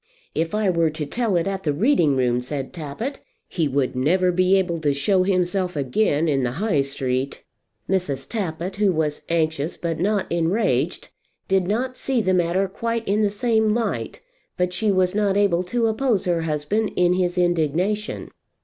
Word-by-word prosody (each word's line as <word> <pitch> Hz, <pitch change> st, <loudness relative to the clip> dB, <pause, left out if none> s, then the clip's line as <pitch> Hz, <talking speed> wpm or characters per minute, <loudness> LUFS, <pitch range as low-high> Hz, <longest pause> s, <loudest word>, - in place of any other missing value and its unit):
"If 165 Hz, +5 st, -1 dB
I 215 Hz, -1 st, +1 dB
were 170 Hz, -3 st, +2 dB
to 155 Hz, 0 st, -4 dB
tell 225 Hz, +5 st, -1 dB
it 170 Hz, -, +1 dB
at 195 Hz, -1 st, -2 dB
the 155 Hz, -, 0 dB
reading 170 Hz, -, +3 dB
room," 125 Hz, -1 st, +1 dB
said 135 Hz, +1 st, -5 dB
Tappitt, 180 Hz, -, -5 dB, 0.3 s
"he 165 Hz, -4 st, -1 dB
would 135 Hz, -2 st, 0 dB
never 180 Hz, +8 st, +2 dB
be 185 Hz, +2 st, +3 dB
able 175 Hz, -3 st, 0 dB
to 145 Hz, -3 st, +1 dB
show 185 Hz, +7 st, +2 dB
himself 185 Hz, -1 st, 0 dB
again 145 Hz, +3 st, +1 dB
in 140 Hz, -3 st, +1 dB
the 125 Hz, -1 st, -1 dB
High 190 Hz, -3 st, +1 dB
Street." 135 Hz, -1 st, -2 dB, 0.4 s
Mrs. 145 Hz, -8 st, -1 dB
Tappitt, 185 Hz, -2 st, -4 dB
who 205 Hz, -2 st, +3 dB
was 155 Hz, -3 st, -1 dB
anxious 160 Hz, -1 st, 0 dB
but 165 Hz, -2 st, -3 dB
not 200 Hz, +2 st, +1 dB
enraged, 170 Hz, +6 st, 0 dB, 0.4 s
did 190 Hz, -2 st, +2 dB
not 255 Hz, +5 st, -1 dB
see 265 Hz, -2 st, 0 dB
the 190 Hz, -4 st, +1 dB
matter 180 Hz, +2 st, +1 dB
quite 230 Hz, +4 st, -3 dB
in 205 Hz, +2 st, +2 dB
the 210 Hz, -, +3 dB
same 220 Hz, 0 st, +1 dB
light, 235 Hz, -1 st, -2 dB, 0.4 s
but 180 Hz, -1 st, 0 dB
she 210 Hz, +3 st, +1 dB
was 185 Hz, -1 st, +2 dB
not 200 Hz, -1 st, +1 dB
able 195 Hz, -4 st, +3 dB
to 235 Hz, +5 st, 0 dB
oppose 225 Hz, -2 st, +1 dB
her 175 Hz, -2 st, +1 dB
husband 160 Hz, +8 st, -1 dB
in 180 Hz, 0 st, +3 dB
his 180 Hz, -1 st, 0 dB
indignation. 175 Hz, +5 st, 0 dB
180 Hz, 175 wpm, -23 LUFS, 155-205 Hz, 0.4 s, reading